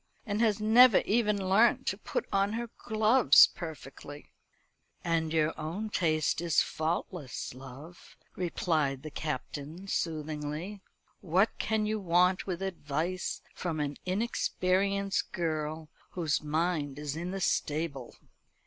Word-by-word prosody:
and 210 Hz, -1 st, -1 dB
has 215 Hz, -3 st, +2 dB
never 225 Hz, +2 st, +7 dB
even 210 Hz, -1 st, +2 dB
learnt 215 Hz, +5 st, +4 dB
to -, -, 0 dB
put -, -, -3 dB
on 195 Hz, +1 st, +2 dB
her 235 Hz, 0 st, -4 dB
gloves 220 Hz, -, +6 dB
perfectly." 145 Hz, -3 st, -9 dB, 0.7 s
"And 165 Hz, -2 st, 0 dB
your 160 Hz, -1 st, +2 dB
own 185 Hz, +8 st, -4 dB
taste 155 Hz, -3 st, +1 dB
is 170 Hz, -2 st, +2 dB
faultless, 160 Hz, -4 st, -3 dB
love," 135 Hz, +7 st, -12 dB, 0.2 s
replied 155 Hz, -6 st, -1 dB
the 155 Hz, -, -7 dB
Captain 150 Hz, +5 st, -5 dB
soothingly. 155 Hz, +3 st, -3 dB, 0.4 s
"What 185 Hz, +5 st, +2 dB
can 220 Hz, -1 st, 0 dB
you 215 Hz, 0 st, -1 dB
want 180 Hz, 0 st, +2 dB
with 185 Hz, 0 st, -3 dB
advice 175 Hz, 0 st, -3 dB
from 165 Hz, -3 st, -3 dB
an 145 Hz, -1 st, -2 dB
inexperienced 195 Hz, -1 st, 0 dB
girl, 155 Hz, -2 st, -2 dB, 0.3 s
whose 160 Hz, -5 st, 0 dB
mind 155 Hz, -2 st, -1 dB
is 150 Hz, -1 st, -4 dB
in 170 Hz, +2 st, -4 dB
the 195 Hz, +1 st, -4 dB
stable?" 150 Hz, -7 st, -2 dB
170 Hz, 120 wpm, -30 LUFS, 155-195 Hz, 0.7 s, never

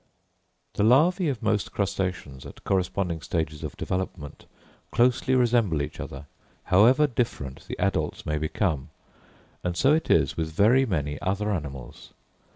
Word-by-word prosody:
The -, -, 0 dB
larvæ 155 Hz, -, +4 dB
of 125 Hz, -6 st, -4 dB
most 105 Hz, -2 st, 0 dB
crustaceans, 95 Hz, -8 st, -3 dB
at -, -, -12 dB
corresponding 90 Hz, -3 st, -1 dB
stages 80 Hz, -3 st, -3 dB
of -, -, -6 dB
development, 90 Hz, -5 st, -5 dB, 0.4 s
closely 125 Hz, +2 st, +2 dB
resemble 115 Hz, -9 st, +2 dB
each -, -, -7 dB
other, 70 Hz, +2 st, -7 dB, 0.4 s
however 120 Hz, +11 st, +5 dB
different 115 Hz, -, -3 dB
the -, -, -5 dB
adults -, -, -1 dB
may 75 Hz, 0 st, -1 dB
become; 80 Hz, -2 st, -1 dB, 0.7 s
and 90 Hz, -1 st, -2 dB
so 135 Hz, +3 st, +4 dB
it 160 Hz, -, 0 dB
is -, -, +3 dB
with 80 Hz, -1 st, -3 dB
very 120 Hz, +10 st, +4 dB
many 75 Hz, -7 st, -2 dB
other 100 Hz, +3 st, -1 dB
animals. 70 Hz, -9 st, -6 dB
95 Hz, 140 wpm, -26 LUFS, 75-120 Hz, 0.7 s, however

